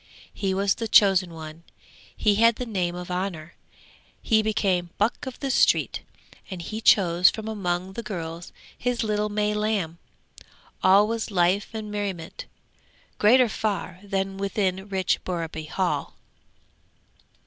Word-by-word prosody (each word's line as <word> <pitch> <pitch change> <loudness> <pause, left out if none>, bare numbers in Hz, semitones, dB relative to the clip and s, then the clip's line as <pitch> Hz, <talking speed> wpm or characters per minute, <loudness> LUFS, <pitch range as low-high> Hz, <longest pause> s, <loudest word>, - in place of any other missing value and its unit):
He 190 -2 -1
was 195 0 +2
the 225 - -4
chosen 195 -4 +5
one, 160 0 -9 0.5
he 210 - +3
had 230 0 +6
the 250 - -4
name 180 -6 -2
of 180 0 -7
honour, 180 -3 -4 0.7
he 220 -2 +2
became 195 -5 0
'Buck 215 +5 0
of 260 - -7
the 275 -2 -1
Street!' - - +2 0.5
and 185 -3 -6
he 215 +6 -5
chose 180 -4 +5
from 220 -1 -6
among 185 -3 -2
the 235 - -5
girls 170 -5 -6 0.2
his 245 -1 -1
little 210 -1 0
May 210 0 0
lamb. 210 -6 -1 0.8
All 195 +3 +6
was 230 0 -2
life 185 +1 +2
and 215 -1 -5
merriment, 195 -6 -5 0.7
greater 245 +4 +6
far 195 -5 -3
than 195 -1 -3
within 195 -1 -1
rich 190 -1 0
Borreby 165 -3 -4
Hall. 185 +3 -2
195 Hz, 135 wpm, -25 LUFS, 180-215 Hz, 0.8 s, had